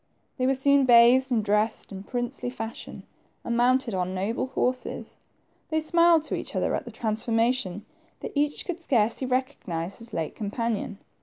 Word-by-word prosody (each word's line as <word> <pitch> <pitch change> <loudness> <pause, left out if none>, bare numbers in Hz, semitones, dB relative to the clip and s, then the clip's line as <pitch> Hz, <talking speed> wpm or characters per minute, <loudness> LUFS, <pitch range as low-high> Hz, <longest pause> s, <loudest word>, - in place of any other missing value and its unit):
They 255 - +2
were 270 - +3
soon 280 0 +3
bathed, 245 +2 +6
and 220 -4 +1
dressed 210 +2 0
in 190 -1 -7
princely 245 +3 -4
fashion, 225 -2 -7 0.4
and 235 - -2
mounted 245 0 +2
on 185 0 -2
noble 210 +7 -1
horses 255 0 -3 0.5
they 315 - +1
smiled 335 0 +4
to - - -2
each - - -6
other - - 0
at - - -2
the - - -8
transformation, 225 -2 -1 0.3
for - - -6
each 290 0 0
could 360 -1 -4
scarcely 240 -3 +1
recognize 200 -10 -3
his 230 0 -9
late 160 -5 -3
companion. 215 -1 -3
240 Hz, 160 wpm, -26 LUFS, 215-260 Hz, 0.5 s, bathed